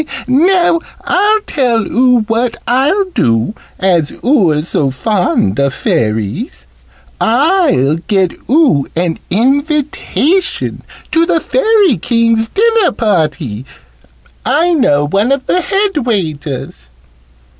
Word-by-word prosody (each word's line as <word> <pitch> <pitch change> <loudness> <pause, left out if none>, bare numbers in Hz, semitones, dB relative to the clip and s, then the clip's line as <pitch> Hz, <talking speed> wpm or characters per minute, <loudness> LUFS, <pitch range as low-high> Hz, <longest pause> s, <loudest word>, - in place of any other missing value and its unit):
Now 340 +5 +3 0.2
I'll 415 +4 +2
tell 245 - 0
oo 250 +1 +2
what 230 +2 -1
I'll 285 +11 +2
do, 115 - 0 0.2
as 175 -6 +1
oo're 180 - +2
so 145 -4 0
fond 135 - -1
of 140 -1 0
Fairies. 105 - -2 0.6
I'll 250 - +2
get 190 -4 +1 0.2
oo 260 - +3
an 170 -1 -1
invitation 285 - 0 0.3
to 330 +1 +2
the 335 - +2
Fairy 415 - +2
King's 230 +1 +1
dinner 450 - +2
party. 155 - -1 0.8
I 310 +9 +1
know 145 - +2
one 200 - 0
of 275 -1 -1
the 365 - +1
head 390 0 -1
waiters." 155 - -4
235 Hz, 105 wpm, -13 LUFS, -, 0.8 s, Now